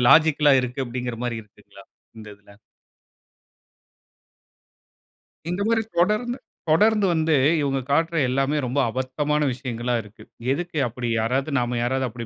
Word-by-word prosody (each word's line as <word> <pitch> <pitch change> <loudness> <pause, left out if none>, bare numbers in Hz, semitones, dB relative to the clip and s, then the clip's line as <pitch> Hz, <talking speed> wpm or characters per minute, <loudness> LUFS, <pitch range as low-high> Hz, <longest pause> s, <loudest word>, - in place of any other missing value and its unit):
லாஜிக்கல்லா 155 -1 +5
இருக்கு" 125 +1 -5
அப்டிங்கற 125 -1 -4
மாரி 115 -2 -2
இருக்குங்ளா 105 - -18 0.4
இந்த 110 -1 -10
இதில? 100 0 -20 3.0
இந்த 180 +3 -2
மாரி 225 -1 +2 0.2
தொடர்ந்து 215 +8 +1 0.3
தொடர்ந்து 210 +5 +4
வந்து 160 -2 +2 0.2
இவங்க 135 -2 0
காட்டுகிற 165 +3 +1
எல்லாமே 135 +3 0
ரொம்ப 125 +3 -1
அபத்தமான 145 +5 -1
விஷயங்களா 125 -1 -3
இருக்கு. 105 +1 -15 0.3
எதுக்கு 170 +2 -3
அப்டி? 120 +1 -4
யாராவது 130 +6 0
நாம 120 0 -1
யாராவது 130 +2 0
அப்டி 120 0 -7
135 Hz, 120 wpm, -23 LUFS, 120-160 Hz, 3.0 s, லாஜிக்கல்லா